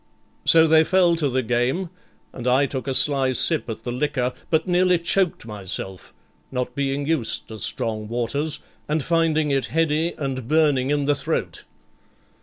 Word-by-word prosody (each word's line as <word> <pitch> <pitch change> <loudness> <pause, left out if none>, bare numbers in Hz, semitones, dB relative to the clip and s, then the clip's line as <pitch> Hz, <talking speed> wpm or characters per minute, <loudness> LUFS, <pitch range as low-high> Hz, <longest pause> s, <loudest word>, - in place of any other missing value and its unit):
So 165 -1 +6
they 160 0 +5
fell 180 0 +3
to 150 -3 0
the 130 0 0
game, 125 +10 0 0.4
and 125 0 -6
I 130 +3 +4
took 135 -1 -5
a 135 - -1
sly 135 -2 +2
sip 155 +1 +1
at 110 - -6
the 120 - -3
liquor, 125 -1 -1 0.2
but 160 +1 +1
nearly 180 0 +3
choked 170 -3 0
myself, 95 -3 -6 0.4
not 125 -1 -3
being 140 +1 -1
used 145 -7 -1
to 110 -1 -8
strong 110 +1 -1
waters, 140 +7 -2 0.3
and 150 -1 0
finding 160 -2 +1
it 135 -1 +1
heady 165 +1 0
and 130 -4 -4
burning 145 -3 +2
in 145 -1 +1
the 145 - +3
throat. - - -3
140 Hz, 165 wpm, -23 LUFS, 125-160 Hz, 0.4 s, So